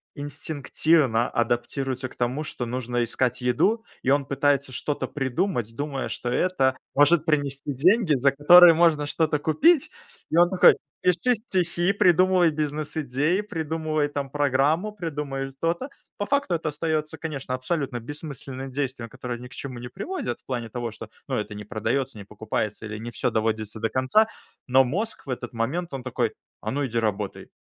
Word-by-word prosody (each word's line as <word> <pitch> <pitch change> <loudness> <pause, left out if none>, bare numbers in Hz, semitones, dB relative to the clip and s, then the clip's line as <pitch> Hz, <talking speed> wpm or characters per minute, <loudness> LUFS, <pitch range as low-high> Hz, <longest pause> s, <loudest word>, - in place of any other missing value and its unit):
инстинктивно 145 -3 +1
адаптируется 125 +3 -1
к - - -17
тому, 125 +5 -1
что 125 -4 -4
нужно 120 0 -2
искать 125 +2 -1
еду, 195 - +2 0.2
и 135 - 0
он 140 0 +3
пытается 140 0 +1
что-то 145 +3 -2
придумать, 130 - -2
думая, 140 -1 -3
что 120 - -4
это 130 -3 +1 0.2
может 150 +2 +5
принести 145 -2 0
деньги, 180 - +4
за 135 +2 +3
которые 170 +5 +8
можно 160 -3 +3
что-то 155 +1 +1
купить. 260 - +3 0.4
И 160 - +1
он 175 0 +6
такой: 185 -1 +6 0.3
"Пиши 185 +8 +3
стихи, 185 -4 0
придумывай 185 -2 +4
бизнес-идеи, 150 +2 -1
придумывай 160 -5 -2
там 140 -2 -4
программу, 145 +7 +1
придумывай 145 -7 -4
то-то". 170 +10 -1 0.3
По 205 - -2
факту 280 -8 +1
это 160 -1 -2
остается, 155 +1 -2
конечно, 140 -5 -4
абсолютно 130 -1 -2
бессмысленным 135 0 -6
действием, 130 -4 -3
которое 125 -1 -6
ни 125 - -9
к - - -21
чему 130 -3 -7
не 125 +1 -7
приводит, 200 - -4
в - - -51
плане 120 -3 -3
того, 120 +1 -4
что, 110 0 -10 0.2
ну, 130 - -1
это 105 0 -4
не 105 0 -7
продается, 120 +4 -2
не 100 - -8
покупается 105 +1 -4
или 105 - -6
не 115 +2 -7
всё - - -1
доводится 110 -1 -2
до 115 +1 0
конца. 130 +13 +3 0.4
Но 130 +1 +5
мозг 190 - -3
в - - -9
этот 125 -1 -5
момент, 140 +10 -2
он 135 - -4
такой: 120 -2 -1 0.3
"А - - -3
ну, 145 +1 -1
иди 120 - -4
работай, 105 -3 -2
140 Hz, 165 wpm, -25 LUFS, 125-165 Hz, 0.4 s, которые